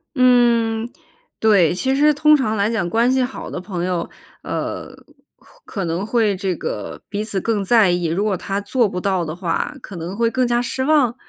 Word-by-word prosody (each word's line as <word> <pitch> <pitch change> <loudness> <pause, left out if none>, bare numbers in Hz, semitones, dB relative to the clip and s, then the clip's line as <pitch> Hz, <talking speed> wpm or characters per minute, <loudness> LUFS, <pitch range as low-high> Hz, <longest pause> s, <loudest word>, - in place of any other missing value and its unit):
嗯 235 -3 +3 0.5
对。 200 -7 +4
其 265 +9 0
实 300 +2 +4
通 305 +1 +5
常 260 -7 0
来 200 +1 +1
讲 215 -7 -1
关 230 +5 +2
系 260 0 +2
好 250 - -6
的 - - -5
朋 180 -1 -4
友， 180 -2 -2 0.3
呃， - - -4 0.7
可 195 -3 -4
能 170 +4 -2
会 220 -3 +1
这 185 -1 -2
个 - - -5
彼 205 +1 -3
此 205 -3 -2
更 210 0 -1
在 210 -2 +4
意， 175 0 -1
如 170 +5 -1
果 210 -2 +1
他 195 +2 -3
做 240 +2 +1
不 180 - -4
到 190 -1 0
的 155 -1 -5
话 180 - -2
可 200 - -10
能 170 +3 -5
会 230 0 +2
更 250 +2 0
加 240 0 +1
失 255 +2 -2
望？ 275 -5 +3
215 Hz, 215 characters per minute, -20 LUFS, 185-245 Hz, 0.7 s, 通